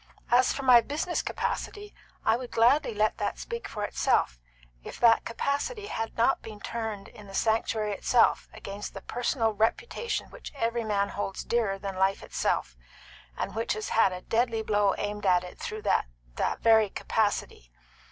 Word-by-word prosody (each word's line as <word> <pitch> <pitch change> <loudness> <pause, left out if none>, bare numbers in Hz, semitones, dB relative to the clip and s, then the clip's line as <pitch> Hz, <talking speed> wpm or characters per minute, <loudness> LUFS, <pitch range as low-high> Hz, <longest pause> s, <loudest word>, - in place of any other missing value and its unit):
As 245 +1 +5
for 275 - -4
my 250 -2 +8
business 310 +7 -2
capacity, 415 0 -4 0.3
I 220 - +4
would 245 0 -5
gladly 240 +2 +3
let 215 +1 +1
that - - -2
speak 470 0 -5
for 210 -2 -5
itself, - - +1 0.4
if - - -9
that 230 -1 +5
capacity 285 - -2
had 225 - -4
not 235 +4 +3
been 215 -2 -9
turned 220 -3 -4
in 210 -1 -13
the 195 - -9
sanctuary 220 -1 +1
itself 230 +4 +2
against 200 +1 -7
the 195 - -6
personal 235 -2 0
reputation 425 - -1
which - - -10
every 235 -2 -1
man 200 -2 0
holds 195 -1 -4
dearer 220 -5 0
than 195 -1 -5
life 190 +1 +1
itself, 60 - -1 0.6
and - - -3
which 225 +1 -1
has 215 0 -4
had 210 -4 +4
a 180 0 -6
deadly 225 0 0
blow 205 -2 +2
aimed 205 0 -3
at 180 -1 +4
it 180 - -10
through 435 -3 -5
that - - +2 0.3
that - - -1
very 220 -2 +5
capacity. 205 - -1
225 Hz, 170 wpm, -28 LUFS, 205-245 Hz, 0.6 s, my